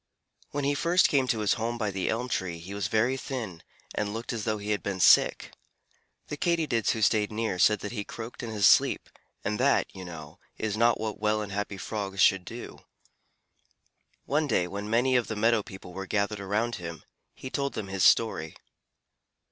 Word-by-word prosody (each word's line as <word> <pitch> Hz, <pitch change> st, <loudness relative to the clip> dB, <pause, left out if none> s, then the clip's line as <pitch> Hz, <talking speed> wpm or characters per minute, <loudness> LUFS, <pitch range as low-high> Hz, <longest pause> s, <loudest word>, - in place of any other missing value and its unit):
When 145 Hz, 0 st, -3 dB
he 140 Hz, +1 st, +2 dB
first 170 Hz, +5 st, +3 dB
came 135 Hz, -3 st, +2 dB
to 110 Hz, -3 st, 0 dB
his 105 Hz, -, +3 dB
home 120 Hz, +1 st, -1 dB
by 105 Hz, -3 st, -1 dB
the 95 Hz, -1 st, -2 dB
elm 120 Hz, +3 st, -1 dB
tree 95 Hz, -8 st, -2 dB
he 85 Hz, +4 st, -9 dB
was 100 Hz, 0 st, -2 dB
very 120 Hz, +4 st, +2 dB
thin, 115 Hz, -11 st, -5 dB, 0.3 s
and 105 Hz, -1 st, -2 dB
looked 115 Hz, +2 st, -4 dB
as 115 Hz, -3 st, -4 dB
though 110 Hz, -1 st, 0 dB
he 105 Hz, +1 st, -4 dB
had 105 Hz, -, 0 dB
been 100 Hz, -2 st, -3 dB
sick. -, -, +5 dB, 0.7 s
The 150 Hz, -, -6 dB
Katydids 155 Hz, -9 st, +1 dB
who 110 Hz, -, -2 dB
stayed 105 Hz, 0 st, +2 dB
near 110 Hz, -4 st, -2 dB
said 105 Hz, +2 st, +4 dB
that 105 Hz, -, -5 dB
he 105 Hz, -4 st, -3 dB
croaked 115 Hz, +3 st, -8 dB
in 120 Hz, -, -5 dB
his 105 Hz, -5 st, +3 dB
sleep, -, -, +4 dB, 0.3 s
and 105 Hz, +2 st, -2 dB
that, 140 Hz, +2 st, +2 dB
you 95 Hz, -, -7 dB
know, 80 Hz, 0 st, -10 dB, 0.2 s
is 110 Hz, -2 st, -2 dB
not 115 Hz, +2 st, +3 dB
what 110 Hz, -1 st, -4 dB
well 105 Hz, 0 st, +1 dB
and 100 Hz, -, -7 dB
happy 105 Hz, 0 st, -3 dB
Frogs 100 Hz, -1 st, -4 dB
should 95 Hz, -1 st, +4 dB
do. -, -, -8 dB, 1.5 s
One 150 Hz, +2 st, +1 dB
day 95 Hz, -8 st, +2 dB
when 100 Hz, +3 st, -5 dB
many 125 Hz, +3 st, +2 dB
of 120 Hz, -2 st, +2 dB
the 110 Hz, -, -3 dB
meadow 115 Hz, +1 st, +3 dB
people 95 Hz, -2 st, -11 dB
were 95 Hz, +1 st, -6 dB
gathered 100 Hz, 0 st, -1 dB
around 110 Hz, +4 st, -1 dB
him, 85 Hz, -2 st, -7 dB, 0.3 s
he 130 Hz, -, -8 dB
told 140 Hz, -1 st, -1 dB
them 105 Hz, -3 st, -4 dB
his 95 Hz, -1 st, -1 dB
story. 80 Hz, -9 st, +3 dB
105 Hz, 200 wpm, -28 LUFS, 100-120 Hz, 1.5 s, sick